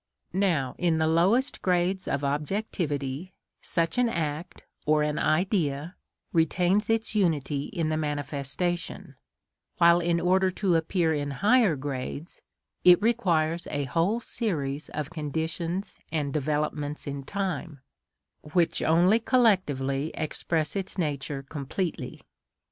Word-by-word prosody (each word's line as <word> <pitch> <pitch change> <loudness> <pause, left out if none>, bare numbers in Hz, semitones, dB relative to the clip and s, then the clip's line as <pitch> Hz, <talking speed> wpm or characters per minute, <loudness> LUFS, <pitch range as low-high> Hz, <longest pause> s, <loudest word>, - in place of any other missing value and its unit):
Now, 170 -9 +1
in 170 -2 +2
the 160 - +2
lowest 190 - +2
grades 185 +1 +1
of 140 0 -1
objectivity, 150 0 -2 0.3
such 165 +7 0
an 245 -1 +3
act 160 -2 -3 0.2
(or 150 0 +4
an 150 0 -1
Idea) 160 -2 0 0.4
retains 180 +5 +2
its 225 0 +1
unity 150 -8 +1
in 165 -5 -2
the 155 - 0
manifestation; 145 +3 -3 0.6
while, 170 -1 +6
in 170 0 +1
order 185 +2 +3
to 185 -1 +1
appear 165 0 +1
in 145 -1 -2 0.2
higher 220 -7 +5
grades, 140 +3 -5 0.4
it 180 -1 +8
requires 175 -8 +1
a 145 - -1
whole 165 - +1
series 155 - -3
of 150 0 -4
conditions 165 +4 -3
and 145 -3 -1
developments 150 0 -2
in 140 -1 -4
time, 175 -5 -4 0.6
which 165 +2 +1
only 175 +7 +4
collectively 160 - +2
express 155 0 -2
its 195 0 -4
nature 145 -4 -2
completely. 150 +5 -4
165 Hz, 120 wpm, -27 LUFS, 145-185 Hz, 0.6 s, it